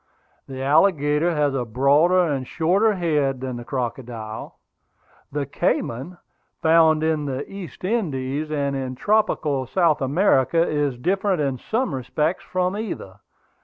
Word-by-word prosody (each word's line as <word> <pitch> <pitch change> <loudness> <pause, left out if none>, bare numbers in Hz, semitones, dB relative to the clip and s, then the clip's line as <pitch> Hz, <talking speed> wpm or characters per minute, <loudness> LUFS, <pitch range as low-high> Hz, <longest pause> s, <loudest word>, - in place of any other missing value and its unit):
The 130 -1 -6
alligator 150 +1 +3
has 145 -2 +1
a 130 -2 -1
broader 140 +10 +3
and 140 -6 -2
shorter 195 +6 +2
head 150 -7 0
than 130 -1 -4
the 120 - -7
crocodile. 120 -3 -5 0.7
The 145 0 -2
cayman, 135 +4 -2 0.4
found 160 -1 +4
in 160 -2 0
the 135 0 -4
East 185 -8 -9
Indies 155 - -2
and 140 -2 -1
in 130 -1 -4
tropical 150 - +1
South 160 -2 +2
America, 165 +2 +2
is 145 -4 -1
different 190 +6 0
in 135 -4 -1
some 225 - -1
respects 150 +6 -1
from 185 +1 -1
either. 180 - -6
150 Hz, 130 wpm, -23 LUFS, 130-175 Hz, 0.7 s, found